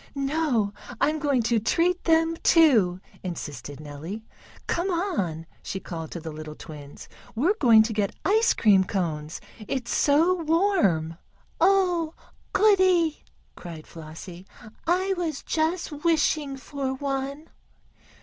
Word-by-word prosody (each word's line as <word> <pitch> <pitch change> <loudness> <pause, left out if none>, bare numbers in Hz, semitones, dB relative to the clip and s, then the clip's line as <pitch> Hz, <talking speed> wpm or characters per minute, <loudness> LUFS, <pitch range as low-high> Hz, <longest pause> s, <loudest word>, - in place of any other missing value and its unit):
"No, 275 -7 0 0.3
I'm 310 +1 +1
going 280 -5 +1
to 230 0 +2
treat 345 - +1
them, 330 0 +3
too," 230 - +4 0.2
insisted 145 -6 -6
Nellie. 155 +9 -8 0.4
"Come 345 +3 -1
on!" 300 - -2 0.2
she 190 - -5
called 165 -4 -7
to 170 - -6
the 160 0 -7
little 155 0 -8
twins, 145 -3 -11 0.3
"we're 310 - +2
going 225 -5 +7
to 220 0 -3
get 205 -2 -1
ice 440 +5 +3
cream 200 -4 +5
cones, 160 -5 -3 0.3
it's 250 -3 -2
so 330 +5 +3
warm." 305 - +1 0.4
"Oh, 355 -3 +2 0.4
goodie!" 370 -6 +3 0.3
cried 165 -3 -9
Flossie. 170 +3 -10 0.4
"I 370 +3 +2
was 320 -5 -3
just 325 +2 -1
wishing 305 -4 +1
for 270 -1 -4
one." 275 +2 -4
270 Hz, 120 wpm, -25 LUFS, -, 0.4 s, going